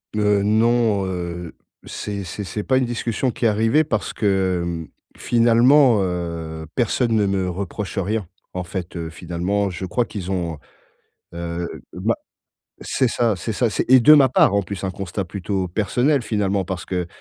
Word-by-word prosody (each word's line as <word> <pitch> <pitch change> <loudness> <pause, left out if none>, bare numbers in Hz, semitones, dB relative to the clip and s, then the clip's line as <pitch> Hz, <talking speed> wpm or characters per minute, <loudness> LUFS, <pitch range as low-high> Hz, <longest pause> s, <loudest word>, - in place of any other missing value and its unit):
Heu, 105 -1 +3
non, 110 -1 +2
heu, 90 -2 -5 0.3
c'est 100 -1 -5
c'est 95 +4 -6
c'est 105 +4 -4
pas 130 +3 +2
une 130 - +2
discussion 120 +1 -1
qui - - -8
est - - +7
arrivée 115 +8 +3
parce 110 -8 -2
que, 95 -4 +1
mmh, 85 -2 -4 0.3
finalement, 120 +1 +5
heu, 85 -3 -4
personne 120 -1 +1
ne 105 -2 +3
me 95 -2 0
reproche 100 +3 -5
rien. 100 +2 -1 0.3
En 90 - -3
fait, 90 0 -6
heu, 85 -1 -4
finalement, 90 +4 -2
je 90 +1 -5
crois 115 +6 0
qu'ils 95 -2 -6
ont, 85 -4 -2 0.8
heu, 85 0 -4 0.3
bah, - - 0 0.7
c'est 130 - +1
ça 115 -2 +1
c'est 110 - -3
ça, 120 +2 +1
c'est 105 - -2
et 130 0 +8
de 150 +6 +8
ma 140 -3 +7
part, 110 - +4
en 100 - +3
plus, 100 +1 -6
un 95 - -1
constat 95 +1 -4
plutôt 95 +1 -3
personnel, 120 - +1
finalement. 100 -4 0
Parce 90 0 -4
que, 90 -2 -2
100 Hz, 175 wpm, -21 LUFS, 90-115 Hz, 0.8 s, et